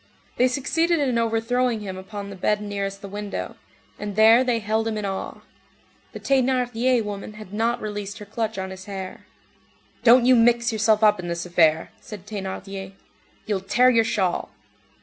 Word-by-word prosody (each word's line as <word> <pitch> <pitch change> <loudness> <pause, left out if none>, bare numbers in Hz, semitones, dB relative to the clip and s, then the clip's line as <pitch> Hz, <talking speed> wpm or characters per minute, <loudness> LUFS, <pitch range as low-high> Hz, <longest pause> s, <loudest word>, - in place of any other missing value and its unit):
They 250 - +4
succeeded 325 +6 0
in 255 -5 +1
overthrowing 230 +1 0
him 190 -2 -6
upon 200 +1 -7
the - - -8
bed 210 +3 0
nearest 200 -1 -4
the - - -6
window, 205 +1 -5 0.4
and 205 -1 -5
there 225 +3 +6
they 245 -2 +1
held 220 +1 -1
him 220 -1 -2
in 210 - -3
awe. 195 -1 -5 0.7
The - - -7
Thénardier 255 -2 +1
woman 205 0 -6
had 215 -2 -11
not 230 +3 0
released 205 -1 -5
her 210 - -9
clutch 220 +1 -3
on 190 0 -4
his 190 0 -9
hair. 190 -2 -7 0.8
"Don't 240 +1 +6
you 255 0 +6
mix 235 0 +3
yourself 215 0 +2
up 210 -2 +5
in 175 - -5
this 170 0 -3
affair," 165 -2 +2
said 205 -3 -10
Thénardier. 195 -1 -6 0.5
"You'll 205 -3 -1
tear 240 +7 +3
your 230 -2 +4
shawl." 195 -6 -1
215 Hz, 170 wpm, -23 LUFS, 195-235 Hz, 0.8 s, there